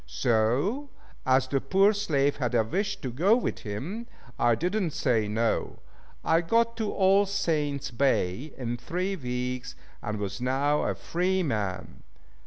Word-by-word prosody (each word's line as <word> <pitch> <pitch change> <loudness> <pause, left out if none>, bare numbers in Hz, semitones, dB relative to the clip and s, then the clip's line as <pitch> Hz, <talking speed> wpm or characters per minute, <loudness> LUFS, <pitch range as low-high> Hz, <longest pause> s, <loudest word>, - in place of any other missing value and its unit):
So, 130 - +1 0.4
as 130 0 +4
the 135 0 0
poor 195 +8 +4
slave 145 -9 +1
had 125 -3 -1
a 115 - +4
wish 195 - -2
to 130 - -3
go 180 - +4
with 245 - -2
him, 150 - -5 0.3
I 120 -1 +4
did 180 - -1
not 190 -8 0
say 115 -6 +1
"no." 110 +2 -1 0.5
I 165 +1 +4
got 230 +6 +2
to 220 -3 -1
All 195 +1 +4
Saints' 150 -8 -1
Bay 130 0 0
in 120 -2 -3
three 180 +9 -2
weeks, 125 -3 -4 0.3
and 105 +1 -3
was 105 +3 -4
now 140 +4 +1
a - - 0
free 185 +2 0
man. 100 - -3
140 Hz, 155 wpm, -27 LUFS, 120-190 Hz, 0.5 s, as